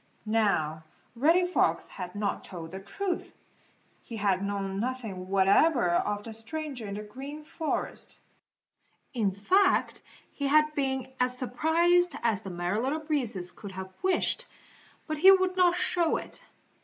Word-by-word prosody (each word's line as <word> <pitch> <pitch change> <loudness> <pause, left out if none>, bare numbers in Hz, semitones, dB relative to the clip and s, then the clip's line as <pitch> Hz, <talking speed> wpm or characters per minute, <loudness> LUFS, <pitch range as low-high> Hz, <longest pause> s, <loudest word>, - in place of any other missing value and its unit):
Now 200 -8 +1 0.3
Reddy 330 +9 +4
Fox 360 - +1
had 180 -1 -8
not 205 -1 -2
told 165 -3 -8
the 190 - -6
truth. 355 - -4 0.6
He 230 - -8
had 200 -2 +1
known 200 -1 -2
nothing 220 -6 -4
whatever 195 - +4
of 205 +4 0
the 225 - -8
stranger 245 +1 -5
in 200 - -5
the 210 - -5
Green 275 +8 -8
Forest. 315 +1 -4 1.0
In 220 -6 +1
fact 370 - +2 0.3
he 280 - -2
had 305 +2 +4
been 265 -3 -1
as 250 0 +1
surprised 335 +8 +2
as 220 -3 +1
the 195 - -7
Merry 175 +3 -1
Little 270 +6 0
Breezes 240 - -2
could 200 0 -10
have 190 0 -7
wished, 380 +6 +1 0.6
but 310 -1 -3
he 375 - +8
would 375 -1 +3
not 355 -1 +4
show 345 -2 +1
it. - - -8
240 Hz, 145 wpm, -28 LUFS, 200-310 Hz, 1.0 s, he